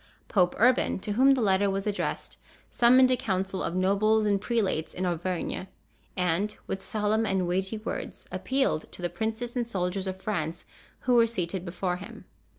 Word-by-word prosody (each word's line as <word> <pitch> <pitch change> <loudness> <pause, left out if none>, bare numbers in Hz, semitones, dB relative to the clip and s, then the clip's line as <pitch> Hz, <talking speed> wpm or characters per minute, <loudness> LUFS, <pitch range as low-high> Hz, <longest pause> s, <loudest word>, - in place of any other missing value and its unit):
Pope 180 -3 +2
Urban, 250 +3 +3
to 210 - -3
whom 265 +6 +5
the 250 - 0
letter 200 0 +3
was 195 0 -2
addressed, 210 -1 -3 0.3
summoned 255 +2 +6
a - - +5
council 190 -4 -2
of 170 - -2
nobles 205 +4 +3
and 200 -2 +2
prelates 205 -10 -1
in 185 - -2
Auvergne 180 +1 -2 0.5
and, 180 +4 0
with 190 - -4
solemn 215 +2 0
and 190 -3 0
weighty 190 +4 -1
words, 215 - -6
appealed 265 - 0
to 180 - -8
the 175 - 0
princes 225 +2 -3
and 240 -2 -1
soldiers 190 -2 -2
of 190 0 -4
France 170 -6 -3 0.4
who 250 - +1
were 230 -1 +6
seated 185 -5 -2
before 180 0 -2
him. 200 +3 -11
195 Hz, 170 wpm, -28 LUFS, 185-225 Hz, 0.5 s, summoned